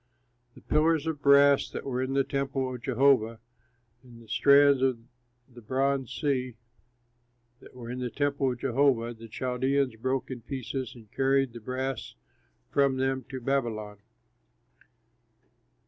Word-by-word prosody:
The - - -15
pillars 160 +1 +2
of 160 -3 -3
brass 140 0 +5
that - - -7
were 130 -2 -2
in 130 +1 -2
the 135 - +3
temple 135 -1 -2
of 125 - -8
Jehovah, 125 -3 +2 0.6
and 120 -2 -15
the 115 - -16
stands 140 +5 +5
and 125 -3 -1 0.4
the 125 -2 -15
bronze 135 +2 -1
sea 130 -3 -1 1.0
that - - -16
were 120 -1 -8
in 125 - -5
the 125 -1 -3
temple 140 +1 0
of 125 - -5
Jehovah 125 -2 +1
the 115 0 -12
Chaldeans 130 +2 -1
broke 130 +3 -2
in 125 -2 -6
pieces 130 0 -5
and 110 -4 -16
carried 135 -2 +1
the 120 - -9
brass 130 +2 -4 0.6
from 140 -2 +2
them 130 0 -1
to 130 -1 -5
Babylon. 115 -6 -2
130 Hz, 145 wpm, -28 LUFS, 120-140 Hz, 1.0 s, brass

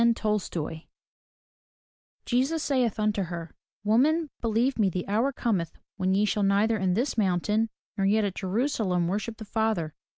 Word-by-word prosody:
Tolstoy 180 -8 -2 1.4
Jesus 270 +6 +1
saith 250 -6 +1
unto 210 -1 +1
her, 170 -1 -6 0.3
Woman, 285 +9 +3
believe 235 +3 +1
me, 200 -3 +4
the 180 0 -4
hour 225 +7 +1
comeih 195 - -1 0.3
when 190 0 +1
ye 205 +2 +3
shall 210 0 0
neither 200 +3 +3
in 185 -1 +1
this 240 +1 0
mountain, 210 +3 +1 0.3
nor 195 -2 +1
yet 215 +2 +3
at 200 -2 -1
Jerusalem, 190 -3 0
worship 215 +4 -2
the 220 - -8
Father. 210 -8 -1
210 Hz, 145 wpm, -27 LUFS, 190-230 Hz, 1.4 s, me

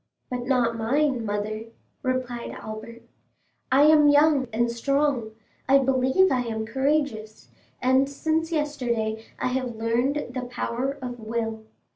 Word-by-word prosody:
"But 250 -1 -3
not 245 -3 +2
mine, 260 +2 +1
mother," 210 +2 -3 0.4
replied 255 -2 -2
Albert. 220 +2 -8 0.7
"I 270 +2 +6
am 300 -1 +6
young 290 -2 +4
and 235 +2 +1
strong; 265 -2 0 0.4
I 275 - +7
believe 265 +7 +3
I 255 - +2
am 220 -2 -3
courageous, 265 -4 -1 0.3
and 260 +2 +3
since 320 +3 -1
yesterday 240 -8 -1
I - - -1
have 255 -2 -2
learned 245 +4 -1
the 250 -1 -4
power 250 +3 -2
of 245 -1 -5
will. 225 0 -3
250 Hz, 130 wpm, -25 LUFS, 230-275 Hz, 0.7 s, I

